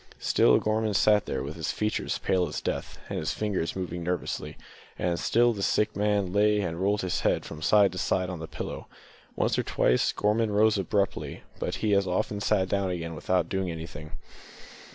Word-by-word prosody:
Still - - +4
Gorman 110 -1 0
sat 105 +1 +4
there, - - -2
with 70 +3 -6
his 80 -2 -2
features 105 0 -1
pale 90 -2 +1
as - - -4
death, - - -4
and - - -3
his 80 - -2
fingers 100 -6 -2
moving 90 -2 -4
nervously; 90 +1 -3 0.4
and 85 -1 -1
still 120 +5 +3
the 100 - -6
sick 105 +2 +1
man 100 -3 +1
lay 105 +1 +3
and 85 -3 -3
rolled 100 +2 +1
his 90 -1 -1
head - - +1
from 80 - -8
side 100 +2 +5
to 90 - -5
side 95 0 0
on 90 -2 -5
the 80 - -6
pillow. - - -6 0.5
Once - - +1
or - - +1
twice 60 - +2
Gorman 105 +1 +1
rose 105 0 +3
abruptly, 100 +1 -1 0.2
but - - -2
he 105 - +3
as 100 -1 +3
often 100 +2 -1
sat 95 -2 +2
down 100 0 0
again 85 -2 -4
without 90 +1 0
doing 95 0 -2
anything. 80 -2 -7
95 Hz, 195 wpm, -27 LUFS, 85-105 Hz, 0.5 s, side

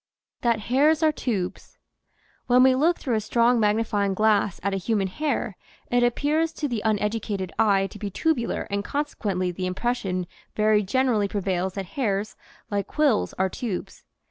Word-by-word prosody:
THAT 235 -3 +1
HAIRS 295 +8 +3
ARE 310 - +5
TUBES 220 -10 -4 0.7
[EN 250 +1 +6
we 260 0 +6
look 320 +7 +2
through 255 - -2
a 220 - +1
strong 235 +3 +3
magnifying 210 -2 +1
glass 210 -2 +2
at 200 0 0
a - - 0
human 200 +1 0
hair 240 -1 -2 0.4
it 245 0 +3
appears 295 +7 +1
to 295 - -2
the 235 -5 -2
uneducated 210 -3 -1
eye 200 -3 +4
to 210 - -9
be 205 - -3
tubular 250 - 0
and 200 0 -1
consequently 205 -10 -2
the 185 +1 -3
impres 240 +7 -1
sion 185 -3 -3 0.3
very 215 0 +3
generally 220 0 +1
prevails 190 -2 -2
that 195 -1 -3
hairs, 205 -2 -2 0.4
like 200 -1 -1
quills, 290 -8 +1
are 190 - +1
tubes. 195 -1 -5
215 Hz, 165 wpm, -25 LUFS, 195-250 Hz, 0.7 s, EN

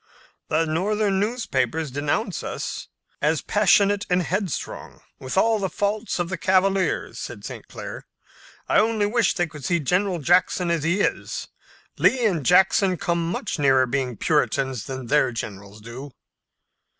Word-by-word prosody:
"The 160 +2 +1
Northern 195 +5 0
newspapers 200 - -1
denounce 150 - -1
us - - -5 0.3
as - - +1
passionate 200 0 +3
and 180 0 +2
headstrong, 185 -1 -4 0.2
with 130 +6 -5
all 225 +2 +3
the 190 -2 -1
faults 205 +3 -2
of 175 -1 -1
the 185 -2 -4
cavaliers," 190 0 +1
said - - -7
St. - - -8
Clair. - - -8 0.6
"I - - +4
only 220 -1 +2
wish 220 0 +1
they 175 - +1
could 150 -3 -11
see 170 +5 +1
General 180 +5 +1
Jackson 175 +2 +2
as 165 -2 0
he 170 +6 +1
is. - - -2 0.5
Lee 255 -3 +3
and 175 -9 +1
Jackson 185 +2 +4
come 170 0 -1
much 175 - -3
nearer 135 -2 +4
being 125 -2 -2
Puritans 135 -5 0
than 130 -1 -6
their 145 +1 +2
generals 100 -2 -7
do." 120 +6 -8
175 Hz, 150 wpm, -23 LUFS, 140-200 Hz, 0.6 s, I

